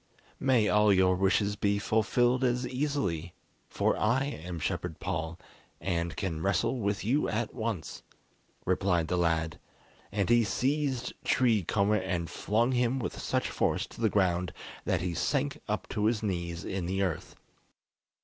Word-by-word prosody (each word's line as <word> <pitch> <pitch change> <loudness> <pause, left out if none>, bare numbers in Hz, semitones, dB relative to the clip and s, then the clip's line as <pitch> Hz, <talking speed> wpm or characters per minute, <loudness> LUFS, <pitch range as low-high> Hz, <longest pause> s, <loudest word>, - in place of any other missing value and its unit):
"May 125 -6 +3
all 105 0 +4
your 95 -1 +4
wishes 100 +2 +2
be 100 0 +1
fulfilled 120 +5 +2
as 125 0 +1
easily, 125 - -2 0.3
for - - +1
I 120 +5 +2
am 90 - -5
Shepherd - - -3
Paul, 80 +1 -3 0.4
and 85 -2 -2
can 85 -6 -2
wrestle 100 +7 +1
with 100 -2 -1
you 135 +7 +2
at 110 +1 -2
once," 110 -8 -4 0.6
replied 90 -3 +1
the 90 - +1
lad; 80 -2 0 0.5
and 100 -2 0
he 120 +2 +5
seized 130 +3 0
Tree 115 -5 +3
Comber 100 +4 +2
and 90 -4 -2
flung 115 +5 +1
him 125 0 +1
with 125 - -4
such - - -1
force - - +1
to - - -12
the 110 - +4
ground 90 -3 +1 0.3
that - - +1
he 90 -1 -2
sank 140 - 0
up 105 0 -2
to 105 -1 -1
his 110 -1 +1
knees 85 -4 -3
in 95 -2 -3
the 95 +2 0
earth. 90 -5 -3
100 Hz, 155 wpm, -30 LUFS, 90-120 Hz, 0.6 s, he